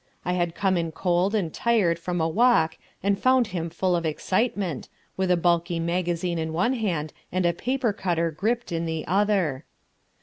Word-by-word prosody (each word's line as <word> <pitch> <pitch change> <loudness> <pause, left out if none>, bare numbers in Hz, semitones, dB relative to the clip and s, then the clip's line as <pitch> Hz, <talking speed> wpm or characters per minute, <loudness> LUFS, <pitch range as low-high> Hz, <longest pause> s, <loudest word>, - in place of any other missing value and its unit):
I 180 - 0
had 175 -2 -1
come 190 -2 +1
in 165 -1 -1
cold 180 +4 +1
and 175 -7 -1
tired 205 -8 +2
from 175 +1 -3
a 160 - +2
walk 185 -4 +3 0.3
and 200 0 +1
found 255 -1 +4
him 170 -3 -3
full 180 +2 0
of 170 - -1
excitement, 185 - -1 0.3
with 190 -1 -1
a 180 - +4
bulky 170 0 +1
magazine 170 0 -1
in 160 0 -3
one 185 +10 +1
hand 175 - -2 0.2
and 185 0 0
a 170 - +3
paper 250 +3 -1
cutter 170 -5 0
gripped 225 +9 -2
in 165 0 -1
the 160 -1 -3
other. 185 -7 +1
175 Hz, 180 wpm, -25 LUFS, 165-200 Hz, 0.3 s, found